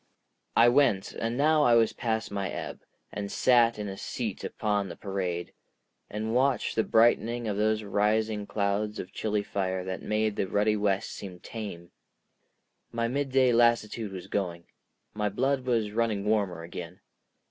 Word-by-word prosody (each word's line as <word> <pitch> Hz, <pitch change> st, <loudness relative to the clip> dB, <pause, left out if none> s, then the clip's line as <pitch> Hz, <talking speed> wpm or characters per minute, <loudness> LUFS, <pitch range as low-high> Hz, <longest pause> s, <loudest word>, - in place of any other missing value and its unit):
I 115 Hz, -, +7 dB
went, 120 Hz, -6 st, +3 dB
and 115 Hz, +1 st, -2 dB
now 155 Hz, +2 st, +4 dB
I 120 Hz, -5 st, +5 dB
was 115 Hz, -1 st, +4 dB
past 110 Hz, -2 st, -2 dB
my 100 Hz, -1 st, -2 dB
ebb, -, -, -5 dB, 0.3 s
and 100 Hz, -1 st, -5 dB
sat 120 Hz, -2 st, +4 dB
in 105 Hz, -1 st, -4 dB
a 95 Hz, -, -5 dB
seat -, -, -4 dB
upon 105 Hz, -2 st, -1 dB
the -, -, -7 dB
parade, 90 Hz, -3 st, -3 dB, 0.6 s
and 110 Hz, +2 st, -3 dB
watched 130 Hz, -1 st, +1 dB
the 110 Hz, -, +3 dB
brightening 115 Hz, +1 st, +3 dB
of 105 Hz, -, -1 dB
those 110 Hz, +1 st, +1 dB
rising 105 Hz, +1 st, 0 dB
clouds 105 Hz, +1 st, -1 dB
of 90 Hz, -, -7 dB
chilly 105 Hz, -1 st, -1 dB
fire 95 Hz, -2 st, -2 dB
that 95 Hz, 0 st, -5 dB
made 105 Hz, 0 st, 0 dB
the 95 Hz, -, 0 dB
ruddy 105 Hz, +3 st, +2 dB
west 100 Hz, -2 st, 0 dB
seem 90 Hz, -3 st, -8 dB
tame. 95 Hz, -7 st, -7 dB, 1.0 s
My 115 Hz, 0 st, -1 dB
midday 130 Hz, -1 st, +2 dB
lassitude 115 Hz, -2 st, +2 dB
was 95 Hz, -2 st, -7 dB
going, 85 Hz, -4 st, -3 dB, 0.5 s
my 105 Hz, 0 st, -1 dB
blood 130 Hz, +5 st, 0 dB
was 115 Hz, -4 st, +1 dB
running 110 Hz, -2 st, 0 dB
warmer 100 Hz, -6 st, 0 dB
again. 85 Hz, +1 st, -8 dB
105 Hz, 160 wpm, -28 LUFS, 100-115 Hz, 1.0 s, I